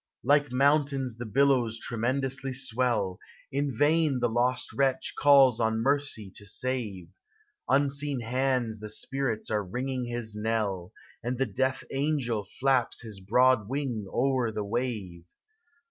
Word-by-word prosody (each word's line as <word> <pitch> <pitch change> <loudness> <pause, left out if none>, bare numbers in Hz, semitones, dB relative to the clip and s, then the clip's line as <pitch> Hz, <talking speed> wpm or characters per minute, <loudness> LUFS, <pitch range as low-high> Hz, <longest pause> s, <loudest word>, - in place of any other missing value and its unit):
Like 145 -1 +3
mountains 135 -2 +1
the 120 - -5
billows 125 -2 +2
tremendously 130 +4 -1
swell; 120 -7 0 0.3
In 140 +1 -1
vain 145 +1 +2
the 120 -1 +1
lost 125 +2 0
wretch 135 -2 0
calls 135 -4 +6
on 110 -1 +1
mercy 140 -7 -1
to 105 - -11
save; 105 -6 -3 0.6
Unseen 140 0 +1
hands 125 -2 -1
of 105 0 -5
spirits 130 -1 -3
are 105 -1 +1
ringing 125 +5 -3
his 120 -2 -3
knell, 105 -4 -2 0.3
And 120 +2 -3
the 135 - +1
death 130 +4 -1
angel 135 -8 -1
flaps 130 -3 +2
his 110 -4 -8
broad 115 +2 +3
wing 130 -7 -3
o'er 130 -2 +1
the 110 -1 -3
wave! 100 -6 -4
125 Hz, 130 wpm, -28 LUFS, 110-135 Hz, 0.6 s, calls